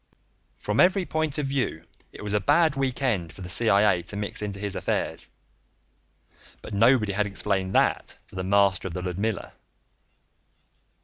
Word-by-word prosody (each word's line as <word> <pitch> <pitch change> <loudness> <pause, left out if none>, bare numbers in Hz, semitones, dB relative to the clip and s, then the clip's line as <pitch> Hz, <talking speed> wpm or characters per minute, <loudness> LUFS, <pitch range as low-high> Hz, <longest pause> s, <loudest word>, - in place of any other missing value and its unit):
From 105 +1 -2
every 185 +1 +4
point 160 -4 -1
of 150 - -1
view 135 -12 -2 0.3
it - - -11
was 105 -1 -2
a 105 - +3
bad 155 +4 +3
week 135 -1 -1
end 95 -11 0
for - - -13
the 90 -1 -4
CIA 100 -4 +4
to 85 +4 -5
mix 105 0 -3
into 100 -1 -4
his 100 -1 -1
affairs, - - -2 1.3
but - - -8
nobody 110 0 +3
had 105 +1 0
explained 95 -1 -2
that - - +1
to - - -14
the 95 0 -4
master 100 0 +2
of 85 - -7
the 90 - -4
Ludmilla. 100 +5 -3
105 Hz, 165 wpm, -25 LUFS, 95-130 Hz, 1.3 s, every